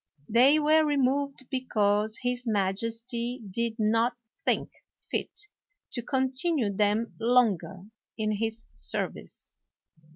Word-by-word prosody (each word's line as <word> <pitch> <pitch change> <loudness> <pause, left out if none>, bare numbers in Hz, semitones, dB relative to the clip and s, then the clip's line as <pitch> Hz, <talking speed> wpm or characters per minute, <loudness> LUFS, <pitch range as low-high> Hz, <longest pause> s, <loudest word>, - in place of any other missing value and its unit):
They 255 +7 +5
were 310 +1 +4
removed 280 -2 0
because 215 -4 +1
his 245 0 -1
majesty 230 +4 -1
did 230 +2 -1
not 230 +2 +2 0.3
think - - 0 0.4
fit - - -2 0.5
to 240 - -2
continue 260 -1 +1
them 210 +3 +1
longer 205 -7 +2 0.3
in 215 -1 0
his 225 +1 -3
service. 70 0 -5
235 Hz, 100 wpm, -28 LUFS, 215-260 Hz, 0.5 s, They